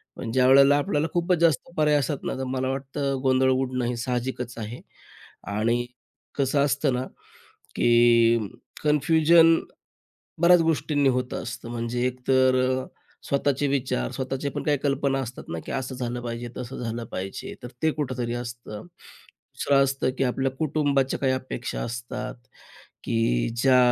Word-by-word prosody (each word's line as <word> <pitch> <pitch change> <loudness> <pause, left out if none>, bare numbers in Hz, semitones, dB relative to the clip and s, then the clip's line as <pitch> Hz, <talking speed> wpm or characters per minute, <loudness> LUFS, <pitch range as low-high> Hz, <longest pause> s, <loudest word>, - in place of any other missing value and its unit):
पण 115 - -5
ज्यावेळेला 135 +3 +6
आपल्याला 145 +2 0
खूपच 175 +1 +2
जास्त 165 -4 +2
पर्याय 150 -1 +3
असतात 140 +1 -3
ना - - -2
तर 130 - -3
मला 130 0 -2
वाटतं 135 +1 -2
गोंधळ 130 0 +3
उडणं 130 -1 0
हे 120 +1 -1
साहजिकच 125 0 -3
आहे 115 +2 -6 0.7
आणि 115 +4 0 0.5
कसं 140 0 +1
असतं 140 -1 +1
ना 125 +1 -2 0.7
की 120 -1 +5 0.4
कन्फ्युजन 160 +2 +5 0.8
बऱ्याच 175 0 +6
गोष्टींनी 150 -3 +1
होत 125 -1 -1
असतं 115 -1 -6
म्हणजे 120 +1 -2
एकतर 130 +1 +2 0.3
अ, - - -9 0.4
स्वतःचे 140 0 +1
विचार 125 - -1
स्वतःचे 135 +2 -3
पण - - -5
काही 150 -1 +2
कल्पना 140 -1 +1
असतात 125 0 -7
ना 80 - -3
की - - -6
असं 130 -1 -3
झालं 125 -1 -4
पाहिजे 120 0 -5
तसं 125 0 -6
झालं 115 0 -3
पाहिजे 95 +1 -5
तर - - -5 0.2
ते 160 - +4
कुठेतरी 130 -5 -3
असतं. 120 -3 -6 0.7
दुसरं 140 -1 +3
असतं 135 -1 0
की - - +1
आपल्या 135 +1 0
कुटुंबाच्या 140 -1 0
काही 135 -1 +1
अपेक्षा 130 -2 -4
असतात 120 0 -5 0.7
की - - +1
ज्या 130 +1 +4
130 Hz, 145 wpm, -25 LUFS, 120-140 Hz, 0.8 s, ज्यावेळेला